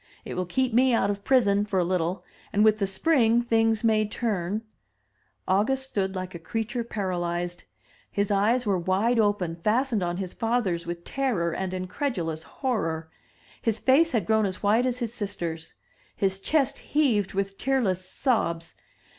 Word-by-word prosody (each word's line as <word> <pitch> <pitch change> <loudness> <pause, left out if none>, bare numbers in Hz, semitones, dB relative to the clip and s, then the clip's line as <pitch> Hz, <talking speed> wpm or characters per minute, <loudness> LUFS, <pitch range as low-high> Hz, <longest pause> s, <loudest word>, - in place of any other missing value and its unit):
It - - -5
will 180 -1 -2
keep 255 +6 0
me 250 +1 +4
out 200 -3 +2
of 200 0 -6
prison 205 -6 +3
for 205 -3 -1
a 175 - +2
Uttle, 180 0 -1 0.3
and 210 - +3
with 215 0 +4
the 200 - +1
spring 235 +2 +3
things 225 -1 +2
may 220 -1 +3
turn 210 -2 -2 0.4
— 105 -2 -43
August 220 +8 +2
stood 195 -5 -2
like 185 0 -5
a 170 - -7
creature 225 +7 -3
paralyzed. 175 -4 -3 0.4
His 200 0 -1
eyes 220 +5 +2
were 195 -3 +1
wide 200 +7 +1
open, 205 -6 +1
fastened 220 +5 +1
on 175 0 -1
his 185 -2 -4
father's 225 -8 -1
with 170 0 -5
terror 210 -12 -1
and 190 +1 -3
incredulous 185 - -3
horror; 165 - -3 0.5
his 225 -2 0
face 300 +6 +4
had 225 -8 0
grown 220 0 +3
as 185 +1 -6
white 220 +5 +3
as 250 -1 -1
his 235 -3 -3
sister's; 170 -7 -5 0.4
his 190 -1 0
chest 275 +5 +1
heaved 235 -11 +1
with 195 0 -2
tearless 230 -9 +1
sobs. 175 - -1
205 Hz, 165 wpm, -26 LUFS, 180-235 Hz, 0.5 s, me